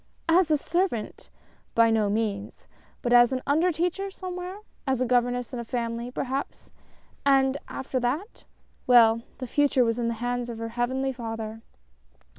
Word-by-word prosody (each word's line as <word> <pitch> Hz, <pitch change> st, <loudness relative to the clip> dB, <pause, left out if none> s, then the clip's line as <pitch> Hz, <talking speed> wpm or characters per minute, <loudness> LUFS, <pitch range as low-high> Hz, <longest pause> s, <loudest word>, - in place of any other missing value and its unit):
As 335 Hz, +1 st, +4 dB
a 305 Hz, -, +4 dB
servant? 340 Hz, -, -2 dB, 0.5 s
By 230 Hz, 0 st, +5 dB
no 215 Hz, -2 st, +2 dB
means! 205 Hz, -1 st, -3 dB, 0.4 s
but 240 Hz, -1 st, +1 dB
as 240 Hz, 0 st, +7 dB
an 255 Hz, -1 st, -2 dB
under 320 Hz, +6 st, +3 dB
teacher, 360 Hz, +4 st, -1 dB
somewhere 365 Hz, 0 st, -6 dB, 0.2 s
— -, -, -36 dB
a 260 Hz, -1 st, +1 dB
governess 245 Hz, 0 st, +1 dB
in 245 Hz, -, -3 dB
a -, -, -3 dB
family, 235 Hz, 0 st, -3 dB
perhaps 265 Hz, +2 st, -4 dB, 0.3 s
— -, -, -31 dB, 0.2 s
and 270 Hz, -1 st, +4 dB
after 265 Hz, -1 st, -3 dB
that? 285 Hz, -, -3 dB, 0.4 s
Well 230 Hz, -2 st, +6 dB
— -, -, -32 dB
the 260 Hz, -, -5 dB
Future 275 Hz, 0 st, +3 dB
was 230 Hz, +1 st, 0 dB
in 235 Hz, -, 0 dB
the 235 Hz, -, -1 dB
hands 245 Hz, +1 st, -2 dB
of 235 Hz, -, -5 dB
her 230 Hz, 0 st, -4 dB
Heavenly 260 Hz, +3 st, -1 dB
Father. 225 Hz, -2 st, -6 dB
245 Hz, 170 wpm, -26 LUFS, 230-280 Hz, 0.5 s, as